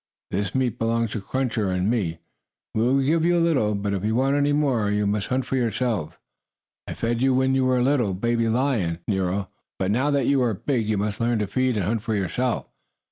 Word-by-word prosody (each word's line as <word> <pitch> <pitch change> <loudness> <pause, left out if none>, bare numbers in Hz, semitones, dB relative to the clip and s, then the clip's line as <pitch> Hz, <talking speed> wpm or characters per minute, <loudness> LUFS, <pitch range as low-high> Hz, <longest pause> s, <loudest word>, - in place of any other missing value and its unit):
This 100 +4 -2
meat 130 -4 0
belongs 115 0 0
to 110 - -3
Cruncher 120 -2 -1
and 90 +1 0
me. 100 -8 0 0.6
We 110 - 0
will 130 +4 +3
give 160 +4 +2
you 175 +1 +3
a 170 0 +3
little, 110 -10 +1
but, 100 0 -2
if 95 -1 -2
you 110 +1 0
want 135 +3 +2
any 145 0 +2
more, 135 -8 +1
you 105 0 +1
must 100 0 -1
hunt 130 0 -1
for - - -2
yourselves. 115 -7 -1 0.7
I - - -5
fed 115 +1 -1
you 130 0 +3
when 130 +1 +2
you 135 -1 +2
were 130 0 +2
a 125 - +2
little 125 -8 +1
baby 115 +3 0
lion, 115 -9 0
Nero, 95 -1 -1 0.3
but 95 +1 0
now 130 +7 +1
that 140 -3 +1
you 140 0 +3
are 120 -4 +1
big 115 0 -1
you 110 - +1
must 105 +1 -2
learn 120 0 +1
to 105 - 0
feed 130 +3 0
and 100 - 0
hunt 110 +3 -1
for 110 0 -2
yourself." 115 +6 -1
115 Hz, 230 wpm, -24 LUFS, 105-130 Hz, 0.7 s, will